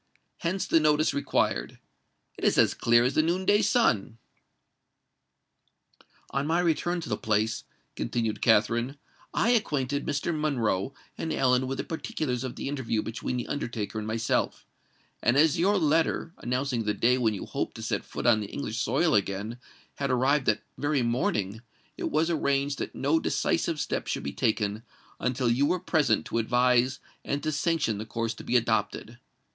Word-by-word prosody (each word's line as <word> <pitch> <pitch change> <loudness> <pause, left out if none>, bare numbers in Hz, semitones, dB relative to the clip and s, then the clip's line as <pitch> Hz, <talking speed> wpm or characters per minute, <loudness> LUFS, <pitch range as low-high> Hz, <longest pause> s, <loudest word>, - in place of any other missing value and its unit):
Hence 185 +3 -1
the 165 - +4
notice 155 0 +3
required. 65 - 0 0.6
It - - -11
is - - +3
as - - +5
clear 120 0 +4
as 125 - +1
the - - +4
noon 175 +4 0
day 205 +2 +4
sun." 115 - +2 2.1
"On 140 +2 -1
my 165 +2 +2
return 175 +1 +1
to 160 - -7
the - - +1
Place," 110 +1 0 0.3
continued 110 -3 -2
Katherine, 120 +4 +2 0.3
"I 230 - +1
acquainted 145 - 0
Mr. 150 +3 -1
Monroe 130 -6 0 0.2
and 160 - -2
Ellen 130 -2 +2
with 135 +1 -3
the - - -2
particulars 135 -6 -3
of 130 - -5
the - - -5
interview 130 -6 -1
between 115 +2 -3
the 120 - -3
undertaker 115 -6 -3
and 105 - -5
myself; 110 +1 -1 0.6
and 120 +3 +3
as 155 +1 +4
your 200 +4 +3
letter, 165 0 +1
announcing 125 -1 -1
the 105 0 0
day 125 +2 +3
when 110 -3 +1
you - - -6
hoped - - -3
to - - -7
set - - -1
foot - - -6
on 120 -2 +5
the 105 - -4
English 110 -6 -4
soil 155 +7 +2
again, 105 +4 -1 0.4
had 140 -1 -1
arrived 130 +2 +2
that 110 - +2 0.2
very 145 -3 +1
morning, 110 -3 -1 0.3
it - - -3
was 160 +3 +1
arranged 140 -2 0
that - - -5
no 150 +4 +2
decisive 165 0 0
step - - -2
should - - -2
be 70 - -4
taken 110 -3 0 0.4
until 125 0 0
you 125 +5 +3
were 180 - +1
present 150 - +1
to 115 - -1
advise 125 +2 +2 0.2
and 140 +1 -2
to 155 - 0
sanction 150 -8 0
the 110 - -5
course 115 +1 -2
to - - -11
be - - -1
adopted. 120 - -1
130 Hz, 175 wpm, -27 LUFS, 115-155 Hz, 2.1 s, as